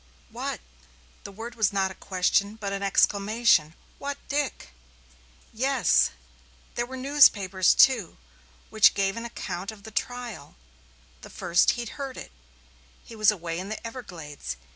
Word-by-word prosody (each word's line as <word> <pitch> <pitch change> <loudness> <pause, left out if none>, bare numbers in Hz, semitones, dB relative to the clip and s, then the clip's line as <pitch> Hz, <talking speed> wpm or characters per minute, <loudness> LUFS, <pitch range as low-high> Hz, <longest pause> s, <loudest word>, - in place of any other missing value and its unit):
"What!" - - -4 0.6
The 200 - -7
word 225 +4 -8
was 220 -4 +1
not 195 -1 0
a - - -8
question, 195 +3 0
but 200 -3 -5
an 195 - -3
exclamation. 200 -4 +2 0.2
"What 280 0 -4
Dick!" 285 - -2 0.8
"Yes 260 +3 +3
yes. - - -20 0.6
There 240 0 -2
were 260 +1 -7
newspapers, 210 -9 +4
too, 235 -10 +4 0.5
which 220 -2 +5
gave 195 -1 0
an 230 0 -5
account 195 -4 -5
of 210 -2 -15
the 220 - -10
trial 235 -9 -5 0.7
the - - -11
first 175 0 +2
he'd 240 -2 -5
heard 270 -2 -5
of - - -6
it - - -18 0.7
he 230 - -11
was 215 -2 +4
away 170 -5 -2
in 190 +2 -6
the 215 - -4
Everglades. 180 - -7
215 Hz, 150 wpm, -26 LUFS, 190-240 Hz, 0.8 s, which